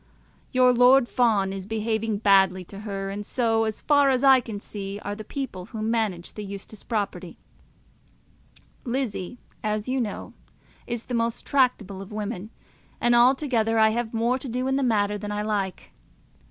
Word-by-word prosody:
Your 255 -1 +5
Lord 250 +1 +6
Fawn 210 -7 +2
is 195 -1 -6
behaving 220 0 -1
badly 195 -3 +4
to 195 +3 -10
her; 195 -2 -4
and 205 +1 -5
so, 225 0 +1
as 220 -1 -4
far 285 -2 +4
as 260 0 +1
I 265 -1 +7
can 225 -4 -6
see, 200 -1 -6
are 205 - -3
the 215 +1 -7
people 215 -7 -5
who 215 +2 -6
manage 220 -6 -1
the 210 - -6
Eustace 200 +1 -9
property. 195 -6 -3 1.5
Lizzie, 245 -5 -3 0.3
as 215 +1 -1
you 260 0 0
know, 215 -4 -5 0.5
is 235 -1 -3
not - - -29
the - - -3
most 230 0 -1
tractable 235 -8 +1
of 195 - -10
women, 210 -1 -5 0.5
and 240 0 +3
altogether 240 -2 +3
I 220 0 +6
have 225 0 -2
more 235 +3 0
to 260 - -6
do 250 +2 -2
in 265 - +1
the 275 - +1
matter 210 -4 +1
than 210 0 -5
I 210 0 -2
like. 200 -4 -3
220 Hz, 175 wpm, -25 LUFS, 200-245 Hz, 1.5 s, I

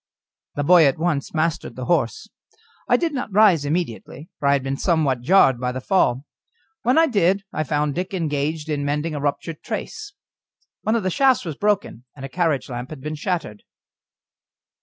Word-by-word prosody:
The 145 - -1
boy 170 0 +6
at 135 - +1
once 155 -4 -1
mastered 155 -6 -2
the 130 - -5
horse. 175 - 0 0.6
I - - +5
did 335 -3 -1
not 255 -5 -4
rise 190 -7 +4
immediately, 150 -1 -4
for 140 - 0
I 140 - +5
had 140 -2 0
been 135 0 -2
somewhat 145 -5 +1
jarred 135 -4 +4
by 125 0 -1
the 130 - -4
fall; 135 -4 +1 0.6
when 250 +5 +2
I 325 - +6
did 200 - +1
I 155 - -1
found 150 0 -1
Dick 180 +4 -3
engaged 155 -3 -2
in 150 -2 -2
mending 150 +3 -1
a 145 - -3
ruptured 150 +2 -3
trace. 425 -1 -6 0.7
One 220 - 0
of 230 - 0
the 185 - 0
shafts 260 -1 +3
was 160 -4 -4
broken, 200 - -1
and 135 -2 -8
a - - -7
carriage 160 -3 0
lamp 125 0 -6
had 155 -4 -9
been 150 +2 -4
shattered. 155 - -3
155 Hz, 185 wpm, -22 LUFS, 140-185 Hz, 0.7 s, boy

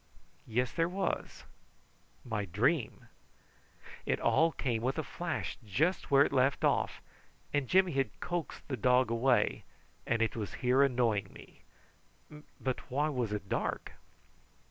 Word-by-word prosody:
Yes 120 +2 0
there 165 0 0
was 190 +1 -3 0.8
my 105 -4 -2
dream. 115 - 0 1.0
It - - 0
all 165 +1 +3
came 120 -7 -2
with 130 +5 -1
a 160 - -1
flash 175 +2 -4
just 155 - 0
where 140 0 +6
it - - -3
left 135 0 +2
off, - - +1 0.5
and 145 -3 +1
Jimmy 185 +2 +4
had 135 -6 -1
coaxed 175 -3 -4
the 130 - -3
dog 125 +1 +3
away, 115 -1 +2 0.4
and 115 -1 +2
it 115 - -1
was 105 -6 -4
here 125 +2 +3
annoying 120 -6 +2
me. - - -15 1.0
But 130 -1 -3
why 145 +4 +1
was 125 -7 -2
it 105 -2 -4
dark? - - -2
130 Hz, 140 wpm, -32 LUFS, 115-145 Hz, 1.0 s, where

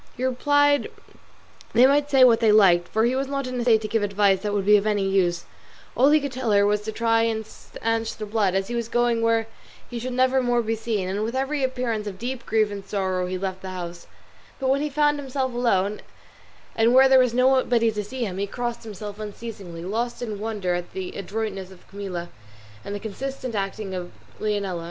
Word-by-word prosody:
He 250 - -4
replied 285 +1 +2 0.8
they 240 +3 +6
might 285 +2 +3
say 270 -2 +5
what 235 -3 +6
they 225 -2 +4
liked, 180 -5 +5
for 220 +1 +1
he 245 +2 +1
was 270 +1 -1
not 275 -1 -2
in 255 -1 -4
a - - 0
state 230 -2 +4
to 215 - -3
give 220 +1 0
advice 200 -1 +2
that 210 - -3
would 200 -2 -1
be 210 +1 +6
of 205 +1 +2
any 205 -2 +1
use; 180 -3 +1 0.5
all 265 +3 +5
he 305 +1 +5
could 280 -2 -4
tell 255 -2 -3
her 200 0 +5
was 210 0 +1
to 220 +1 -5
try 225 +1 +2
and 225 -1 -1
stanch 225 +1 -4
the 215 - -5
blood, 205 -3 0
as 195 0 0
he 240 - -5
was 235 -1 -2
going 240 -1 +1
where 230 0 +2 0.5
he 240 - -4
should 250 +2 -4
never 260 +1 +3
more 245 -1 +1
be 225 0 -1
seen; 220 -4 -2
and 200 +3 -2
with 230 +3 -3
every 270 +2 -1
appearance 250 -5 -2
of 195 -2 -6
deep 245 +3 -5
grief 215 -1 +2
and 200 -1 -7
sorrow 185 -3 -1
he 185 0 -3
left 190 0 -4
the 190 - -6
house; 175 -2 -7 0.5
but 265 -1 0
when 275 +1 +1
he 300 - -1
found 295 0 +2
himself 265 -2 -3
alone, 210 -4 0 0.7
and 230 +2 +3
where 265 +1 +8
there 265 0 +6
was 250 -2 +2
nobody 250 -3 +3
to 210 -1 -3
see 245 +4 -4
him, 190 -2 -5
he 200 - -1
crossed 240 +2 -4
himself 210 -1 -8
unceasingly, 205 -5 -7
lost 230 +5 -2
in 215 -4 -5
wonder 210 -4 -2
at 175 0 -4
the 190 -1 -5
adroitness 195 -1 -4
of 185 -2 -17
Camilla 185 -4 -6 0.5
and 200 - -5
the - - -4
consistent 255 +4 -5
acting 195 -1 -3
of 180 -1 -5 0.3
Leonela. 200 -4 -1
220 Hz, 220 wpm, -24 LUFS, 200-250 Hz, 0.8 s, where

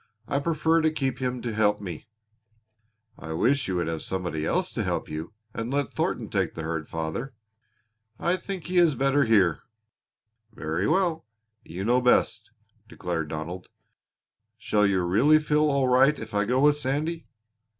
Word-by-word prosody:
I 140 - 0
prefer 160 +2 +2
to 160 - +3
keep 135 -4 -2
him 125 -1 -2
to 120 -2 -3
help 105 -1 +2
me." 95 -4 -7 1.1
"I 80 0 -6
wish 130 - +1
you 95 - -1
would 85 -1 0
have 80 -1 -3
somebody 90 -5 -3
else - - 0
to - - -2
help - - -2
you 80 +6 -6 0.2
and 115 +1 -4
let 140 -2 0
Thornton - - -2
take - - -1
the 80 - -5
herd, 80 -1 -4
father." 80 +11 -4 0.8
"I 175 - +1
think 185 -2 -6
he 180 0 +2
is 165 -5 +4
better 135 +2 +2
here." 100 -8 +3 0.9
"Very 80 +3 -2
well. 170 - +1 0.4
You 90 +4 -6
know 120 +4 +3
best," 125 0 +2 0.4
declared 85 -3 -3
Donald. 80 +4 -6 0.9
"Shall 105 -1 +2
you 95 -2 +1
really 120 +13 +5
feel 150 0 +2
all 140 -2 +2
right 135 +4 +4
if 110 0 -8
I 105 0 +1
go 125 +4 +1
with 145 0 +5
Sandy?" 150 +5 -2
120 Hz, 165 wpm, -26 LUFS, 90-145 Hz, 1.1 s, really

